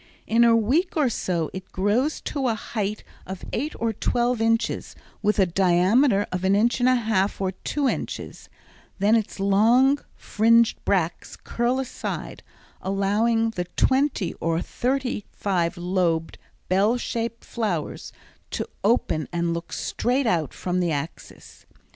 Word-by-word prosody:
In 230 Hz, +1 st, +3 dB
a 230 Hz, -1 st, +6 dB
week 280 Hz, -, +1 dB
or 290 Hz, -5 st, +3 dB
so 170 Hz, -6 st, -2 dB
it 190 Hz, 0 st, -8 dB
grows 220 Hz, +11 st, 0 dB
to 275 Hz, -3 st, -2 dB
a 230 Hz, -, +1 dB
height 210 Hz, -1 st, -4 dB, 0.2 s
of 190 Hz, 0 st, -7 dB
eight 295 Hz, +6 st, -2 dB
or 230 Hz, -1 st, 0 dB
twelve 240 Hz, +2 st, 0 dB
inches 225 Hz, +1 st, 0 dB, 0.3 s
with 210 Hz, 0 st, +1 dB
a 195 Hz, -, +5 dB
diameter 195 Hz, -, +3 dB
of 180 Hz, 0 st, -3 dB
an 190 Hz, +1 st, +3 dB
inch 235 Hz, +5 st, +2 dB
and 245 Hz, +1 st, +4 dB
a 255 Hz, -, +4 dB
half 215 Hz, -4 st, 0 dB
or 190 Hz, -1 st, 0 dB
two 280 Hz, +9 st, -2 dB
inches; -, -, -4 dB, 0.5 s
then 205 Hz, +3 st, +3 dB
its 220 Hz, -3 st, -2 dB
long 230 Hz, +8 st, +4 dB, 0.2 s
fringed 230 Hz, +2 st, +3 dB
bracts 175 Hz, -4 st, -1 dB
curl 240 Hz, +2 st, -1 dB
aside, 265 Hz, -2 st, -5 dB, 0.4 s
allowing 215 Hz, +4 st, +1 dB
the 180 Hz, -5 st, -3 dB
twenty 265 Hz, -, +2 dB
or 165 Hz, 0 st, +1 dB
thirty 250 Hz, +2 st, -2 dB
five 180 Hz, -3 st, -1 dB
lobed, 175 Hz, -2 st, -1 dB, 0.3 s
bell 200 Hz, +6 st, +3 dB
shaped 230 Hz, -1 st, -4 dB
flowers 200 Hz, -10 st, -3 dB, 0.4 s
to -, -, -3 dB, 0.2 s
open 200 Hz, -7 st, +1 dB
and 170 Hz, -1 st, 0 dB
look 170 Hz, 0 st, -6 dB
straight 255 Hz, +3 st, -1 dB
out 165 Hz, -, +1 dB
from 180 Hz, 0 st, -2 dB
the 175 Hz, -2 st, +1 dB
axis. 150 Hz, +2 st, -7 dB
210 Hz, 145 wpm, -24 LUFS, 185-240 Hz, 0.5 s, a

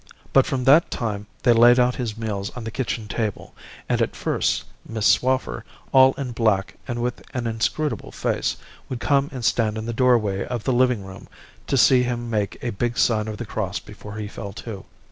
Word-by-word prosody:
But 135 Hz, -, +5 dB
from 130 Hz, -2 st, -1 dB
that 145 Hz, +6 st, +6 dB
time 105 Hz, -3 st, -3 dB, 0.2 s
they 120 Hz, -, +6 dB
laid 120 Hz, +2 st, +7 dB
out 125 Hz, 0 st, +2 dB
his 115 Hz, -4 st, -3 dB
meals 105 Hz, -3 st, -3 dB
on 125 Hz, -, -5 dB
the 110 Hz, -, -5 dB
kitchen 115 Hz, -3 st, -3 dB
table; 105 Hz, -1 st, -3 dB, 0.3 s
and -, -, +1 dB
at -, -, 0 dB
first, -, -, 0 dB, 0.2 s
Miss 110 Hz, -2 st, -3 dB
Swaffer, 130 Hz, -, +2 dB, 0.3 s
all 130 Hz, 0 st, +7 dB
in 135 Hz, -3 st, -5 dB
black 110 Hz, -5 st, +1 dB
and 120 Hz, -2 st, -3 dB
with 125 Hz, 0 st, -2 dB
an 120 Hz, -2 st, -2 dB
inscrutable 115 Hz, +3 st, -1 dB
face, -, -, -1 dB, 0.3 s
would 130 Hz, -, -4 dB
come 140 Hz, +2 st, +2 dB
and 125 Hz, -4 st, -5 dB
stand 110 Hz, -3 st, +1 dB
in 110 Hz, -, -4 dB
the 115 Hz, -, -3 dB
doorway 115 Hz, -6 st, +2 dB
of 120 Hz, -3 st, -4 dB
the 130 Hz, -, +1 dB
living 125 Hz, -5 st, +2 dB
room 95 Hz, -1 st, -11 dB, 0.4 s
to 135 Hz, -, +1 dB
see 125 Hz, +1 st, +6 dB
him 120 Hz, -1 st, -2 dB
make 105 Hz, -3 st, -1 dB
a 120 Hz, -, -1 dB
big 120 Hz, +4 st, -2 dB
sign 110 Hz, -2 st, +2 dB
of 110 Hz, -1 st, -5 dB
the -, -, -5 dB
cross -, -, -3 dB
before 105 Hz, 0 st, -10 dB
he 105 Hz, -1 st, -4 dB
fell 100 Hz, -1 st, -7 dB
to. 105 Hz, -2 st, -8 dB
115 Hz, 200 wpm, -23 LUFS, 105-125 Hz, 0.4 s, laid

